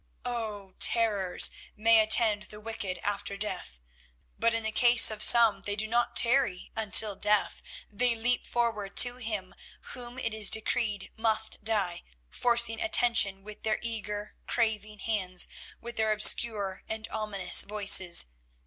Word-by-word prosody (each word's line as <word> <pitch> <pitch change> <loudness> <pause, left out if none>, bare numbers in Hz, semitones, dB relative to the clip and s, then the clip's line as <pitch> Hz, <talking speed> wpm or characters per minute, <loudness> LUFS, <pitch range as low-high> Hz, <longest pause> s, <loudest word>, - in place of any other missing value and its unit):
Oh! 215 -5 -7
terrors 205 -6 +2 0.2
may 225 +1 +3
attend 215 -1 +2
the 210 - -10
wicked 210 -4 -7
after 200 -1 -5
death, 185 - -6 0.6
but 230 - 0
in 230 0 -3
the 220 - -3
case 240 0 +5
of 215 -1 -8
some 220 -3 +5
they 205 +1 -3
do 215 +1 -5
not 235 +2 -2
tarry 230 -7 +1
until 215 -1 +4
death; 205 +1 0 0.3
they 235 +3 +1
leap 240 +2 0
forward 225 -5 -4
to 245 0 +6
him 210 -6 -6 0.4
whom 245 0 -8
it 230 -4 -4
is 215 -2 +4
decreed 220 -2 -3
must 220 -1 +1
die, 200 -6 -2 0.3
forcing 235 -2 0
attention 220 -4 +3
with 210 0 -13
their 220 -1 -2
eager, 210 -2 -7
craving 215 -2 -3
hands, 190 -4 -3 0.3
with 235 0 -11
their 220 -1 -1
obscure 210 -2 +2
and 220 0 -6
ominous 200 -4 0
voices. 195 - +2
215 Hz, 140 wpm, -26 LUFS, 205-230 Hz, 0.6 s, to